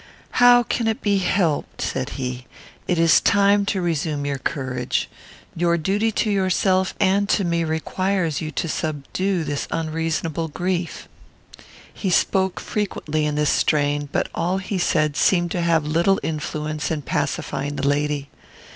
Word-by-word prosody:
"How 245 Hz, 0 st, +7 dB
can 235 Hz, 0 st, -1 dB
it 220 Hz, -, -1 dB
be 200 Hz, -2 st, +2 dB
helped?" 180 Hz, -5 st, 0 dB
said -, -, -2 dB
he. 125 Hz, -1 st, -4 dB, 0.4 s
"It 180 Hz, -, +1 dB
is 165 Hz, -1 st, +5 dB
time 200 Hz, 0 st, +3 dB
to 190 Hz, -3 st, 0 dB
resume 155 Hz, -3 st, -1 dB
your 140 Hz, -1 st, -2 dB
courage. 130 Hz, -2 st, -2 dB, 0.5 s
Your 170 Hz, 0 st, +2 dB
duty 205 Hz, +7 st, 0 dB
to 215 Hz, -, 0 dB
yourself 190 Hz, -1 st, +1 dB
and 200 Hz, +1 st, +2 dB
to 200 Hz, -, +2 dB
me 170 Hz, -1 st, 0 dB
requires 165 Hz, 0 st, -1 dB
you 155 Hz, -, -3 dB
to 160 Hz, -, -3 dB
subdue 160 Hz, +5 st, -2 dB
this 145 Hz, -2 st, -3 dB
unreasonable 165 Hz, 0 st, -2 dB
grief." 175 Hz, +2 st, -3 dB, 0.9 s
He 195 Hz, -, -3 dB
spoke 190 Hz, +1 st, +1 dB
frequently 155 Hz, -7 st, -2 dB
in 150 Hz, -, -2 dB
this 150 Hz, 0 st, +2 dB
strain, 145 Hz, -1 st, +1 dB
but -, -, 0 dB
all 180 Hz, +3 st, 0 dB
he 190 Hz, 0 st, -3 dB
said 155 Hz, -4 st, +1 dB
seemed 175 Hz, +3 st, +2 dB
to 175 Hz, -, -1 dB
have 165 Hz, -3 st, +2 dB
little 170 Hz, +6 st, +2 dB
influence 155 Hz, -1 st, -3 dB
in 155 Hz, -3 st, -2 dB
pacifying 145 Hz, +2 st, -2 dB
the 140 Hz, 0 st, -1 dB
lady. 145 Hz, 0 st, 0 dB
165 Hz, 150 wpm, -22 LUFS, 150-190 Hz, 0.9 s, How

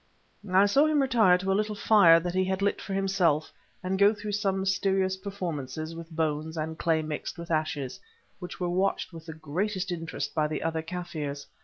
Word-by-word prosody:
I 190 Hz, +2 st, +6 dB
saw 275 Hz, +9 st, +4 dB
him 305 Hz, -1 st, +2 dB
retire 230 Hz, -9 st, +4 dB
to 190 Hz, +1 st, -2 dB
a -, -, +4 dB
little 210 Hz, +1 st, 0 dB
fire 200 Hz, -5 st, +6 dB
that 175 Hz, +1 st, -3 dB
he 185 Hz, 0 st, +2 dB
had 190 Hz, +1 st, -1 dB
lit 200 Hz, -, 0 dB
for 195 Hz, -, -4 dB
himself, 185 Hz, -6 st, +1 dB, 0.3 s
and 190 Hz, +1 st, -1 dB
go 205 Hz, +2 st, +5 dB
through 210 Hz, 0 st, -5 dB
some 195 Hz, -2 st, 0 dB
mysterious 190 Hz, 0 st, +1 dB
performances 165 Hz, -6 st, -5 dB
with 165 Hz, 0 st, -9 dB
bones 160 Hz, 0 st, -2 dB
and 160 Hz, +1 st, -3 dB
clay 160 Hz, 0 st, +1 dB
mixed 155 Hz, +3 st, -5 dB
with 170 Hz, 0 st, -7 dB
ashes, 155 Hz, -4 st, -2 dB, 0.4 s
which 180 Hz, 0 st, -8 dB
were 180 Hz, -, -1 dB
watched 185 Hz, +1 st, 0 dB
with 165 Hz, 0 st, -11 dB
the 160 Hz, -, -6 dB
greatest 180 Hz, +5 st, -3 dB
interest 160 Hz, -4 st, -4 dB
by 155 Hz, -2 st, +1 dB
the 155 Hz, -, -4 dB
other 165 Hz, 0 st, -1 dB
Kaffirs. 160 Hz, -5 st, -5 dB
180 Hz, 195 wpm, -28 LUFS, 160-195 Hz, 0.4 s, I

